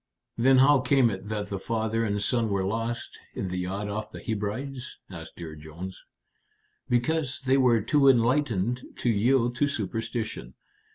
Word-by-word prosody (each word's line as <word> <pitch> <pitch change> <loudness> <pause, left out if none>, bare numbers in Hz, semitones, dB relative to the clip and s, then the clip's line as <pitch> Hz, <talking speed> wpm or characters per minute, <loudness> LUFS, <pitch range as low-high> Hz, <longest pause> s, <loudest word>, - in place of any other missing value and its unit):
"Then 130 +3 +4
how 140 +2 +6
came 130 -2 +3
it 95 +1 -6
that 105 -1 -3
the 100 - -3
father 115 +1 -1
and 105 -2 0
son 115 0 +1
were 100 -2 0
lost 115 +4 -3 0.2
in 95 - -3
the 90 0 -3
yacht 95 +3 -3
off 105 +1 -4
the - - -9
Hebrides?" 120 +5 -4
asked 80 -3 -9
Dear 80 -3 -7
Jones. 80 +5 -9 0.9
"Because 140 +3 0
they 135 0 +3
were 120 -4 +4
too 140 +6 +3
enlightened 125 -2 +2
to 120 - -1
yield 120 +3 +2
to 145 - +3
superstition. 110 - -4
115 Hz, 160 wpm, -27 LUFS, 100-130 Hz, 0.9 s, how